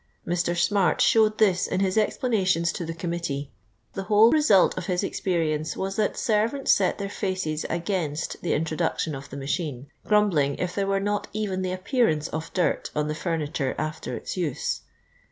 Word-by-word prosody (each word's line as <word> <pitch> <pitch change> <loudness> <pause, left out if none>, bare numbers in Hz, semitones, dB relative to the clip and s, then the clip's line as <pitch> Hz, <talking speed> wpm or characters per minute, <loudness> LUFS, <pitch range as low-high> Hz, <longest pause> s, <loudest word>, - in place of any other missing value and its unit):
Mr. 175 0 0
Smart 195 +1 +2
showed 215 -1 +4
this 190 -4 +3
in - - -1
his 190 -1 +1
explanations 195 -6 +1
to - - -5
the 165 0 -4
Committee. 165 -5 -3 0.4
The 195 - -3
whole 215 +2 +6
result 295 - +4
of - - -5
his 180 0 0
experience 160 -5 -1
was 195 0 -3
that 215 - 0
servants 230 +4 +1
set 190 -2 +3
their 200 - -3
faces 185 -6 -2
against 170 -3 -2
the 175 - 0
introduction 160 0 -1
of 135 0 -8
the 140 - -7
machine, 140 -1 -3
grumbling 180 -10 +2
if 180 -1 -3
there 200 -1 -1
were 195 0 +1
not 205 +1 -1
even 200 -3 -2
the 185 -1 -2
appearance 185 - +1
of 160 +1 -5
dirt 180 -3 0
on 150 0 0
the - - 0
furniture 155 -4 -2
after 155 0 -4
its - - -6
use. 170 -8 -2
180 Hz, 170 wpm, -25 LUFS, 155-200 Hz, 0.4 s, whole